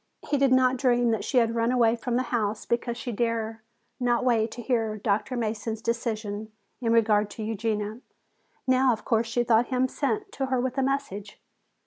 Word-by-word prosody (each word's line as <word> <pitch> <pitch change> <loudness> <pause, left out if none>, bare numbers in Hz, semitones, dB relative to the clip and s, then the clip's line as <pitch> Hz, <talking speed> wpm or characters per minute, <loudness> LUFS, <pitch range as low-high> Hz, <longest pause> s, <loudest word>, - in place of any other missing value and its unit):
He 285 - +1
did 275 -1 +3
not 255 0 +4
dream 245 -2 +3
that 225 - -1
she 260 - -1
had 230 -1 +3
run 230 +1 +1
away 235 -2 +3
from 240 +1 -3
the 255 - +2
house 215 -2 -1
because 235 0 -1
she 245 +1 -4
dared 225 0 -1 0.4
not 245 0 +1
wait 230 -3 +2
to 240 - -8
hear 225 -4 0
Dr. 210 +4 -1
Mason's 220 -1 -2
decision 220 -2 -3 0.3
in 230 -2 +1
regard 215 -2 +3
to 220 - -7
Eugenia. 215 +1 -2 0.6
Now, 260 -1 +4
of 215 - -7
course, 225 0 +1
she 240 +1 0
thought 235 0 +3
him 255 0 +1
sent 395 +10 -2
to 270 -1 -2
her 260 -1 +1
with 260 +2 -1
a - - +2
message. 260 -7 -3
235 Hz, 190 wpm, -26 LUFS, 220-255 Hz, 0.6 s, not